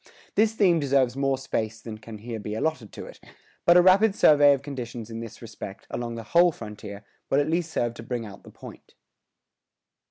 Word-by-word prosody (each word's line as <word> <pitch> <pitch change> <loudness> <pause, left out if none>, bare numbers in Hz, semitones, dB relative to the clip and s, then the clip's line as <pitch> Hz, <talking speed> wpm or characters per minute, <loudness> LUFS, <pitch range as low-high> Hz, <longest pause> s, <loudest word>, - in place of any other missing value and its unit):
This 220 +1 +3
theme 185 -6 +3
deserves 135 -3 +2
more 135 -1 0
space 110 -4 -3
than 110 -1 -8
can 110 0 -10
here 115 +1 -6
be 105 +1 -5
allotted 125 -3 -2
to - - -8
it; - - -13 0.5
but 175 +1 +7
a 180 - +7
rapid 195 +3 +5
survey 145 -1 +6
of 135 - -10
conditions 120 -5 -7
in 115 - -5
this 115 +1 -9
respect, 105 -3 -9
along 120 -1 -4
the 115 - -6
whole 175 +1 +6
frontier, 105 -5 -9 0.2
will 135 - +3
at 145 - +1
least 170 +1 -1
serve 120 -5 -1
to 120 - -10
bring 115 0 -4
out 100 -2 -11
the - - -14
point. - - -13
120 Hz, 200 wpm, -25 LUFS, 115-155 Hz, 0.5 s, but